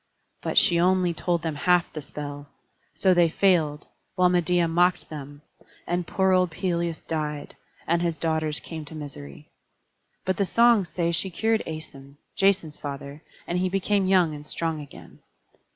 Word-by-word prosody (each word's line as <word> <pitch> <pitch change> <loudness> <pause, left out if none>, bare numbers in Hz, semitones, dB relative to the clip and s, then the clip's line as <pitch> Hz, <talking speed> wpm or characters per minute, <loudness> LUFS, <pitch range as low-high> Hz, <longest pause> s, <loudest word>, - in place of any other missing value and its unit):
But - - -3
she 170 -1 +6
only 180 0 +3
told 170 0 -1
them 160 -2 -1
half 175 +3 +2
the 155 - -5
spell; 145 0 -7 0.5
so 190 -1 +4
they 175 -2 +4
failed, 160 -5 +2 0.3
while 180 -1 +4
Medeia 175 -1 +2
mocked 175 +2 +2
them; 145 -1 -9 0.4
and 175 -1 -2
poor 190 0 +2
old 185 -1 +3
Pelias 170 0 -2
died, 150 -2 -4 0.3
and 170 +1 +1
his 170 -2 -1
daughters 160 -2 -1
came 160 -2 -7
to 160 - -10
misery. 130 - -9 0.8
But 185 -1 0
the 200 - +2
songs 230 -3 +4
say 170 +1 -1
she 170 +3 -1
cured 220 +5 +1
Æson, 140 -3 -9 0.2
Jason's 195 -6 +2
father, 140 +1 -7 0.2
and 175 +1 -1
he 185 0 +1
became 195 +1 +1
young 180 -4 +3
and 145 0 -8
strong 160 0 -3
again. 145 - -13
170 Hz, 160 wpm, -25 LUFS, 150-180 Hz, 0.8 s, she